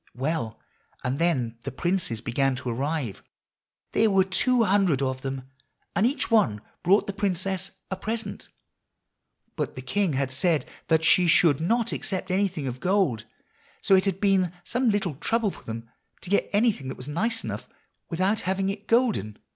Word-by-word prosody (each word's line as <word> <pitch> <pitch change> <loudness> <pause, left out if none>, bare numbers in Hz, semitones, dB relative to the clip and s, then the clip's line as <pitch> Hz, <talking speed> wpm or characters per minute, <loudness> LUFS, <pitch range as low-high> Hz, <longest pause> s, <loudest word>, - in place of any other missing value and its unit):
Well, 125 -4 -2 0.4
and 130 +3 -1
then 125 -9 0
the - - -5
princes 170 - -1
began 130 +3 +1
to 125 - -4
arrive. 135 -2 -2 0.7
There 220 - +3
were 195 -1 +4
two 230 +6 +2
hundred 190 -8 +3
of 130 -1 -2
them, 135 -1 -5 0.5
and 215 - +4
each 265 -2 -2
one 125 - +4 0.2
brought 195 +4 +4
the 200 - -4
princess 190 -1 -1 0.2
a - - 0
present. 220 +4 -4 1.1
But - - -3
the - - -7
king 200 -6 0
had 135 -1 0
said 155 +3 +1 0.2
that 160 0 +3
she 180 +1 +5
should 160 -3 +5
not 230 +7 +1
accept 190 -1 -3
anything 185 -6 0
of 125 -1 -4
gold, 180 - +1 0.5
so - - +2
it 190 0 +5
had 195 -1 0
been 195 -4 +3
some 245 +4 +1
little 200 -6 0
trouble 225 +4 +1
for - - -14
them 115 +1 -6 0.3
to 185 - -9
get 205 - +2
anything 205 - +2
that 130 - -5
was 125 - -7
nice 225 +10 -1
enough - - -5 0.4
without 190 +5 +1
having 190 +1 0
it 205 +1 -9
golden. 225 - +2
180 Hz, 170 wpm, -26 LUFS, 135-200 Hz, 1.1 s, she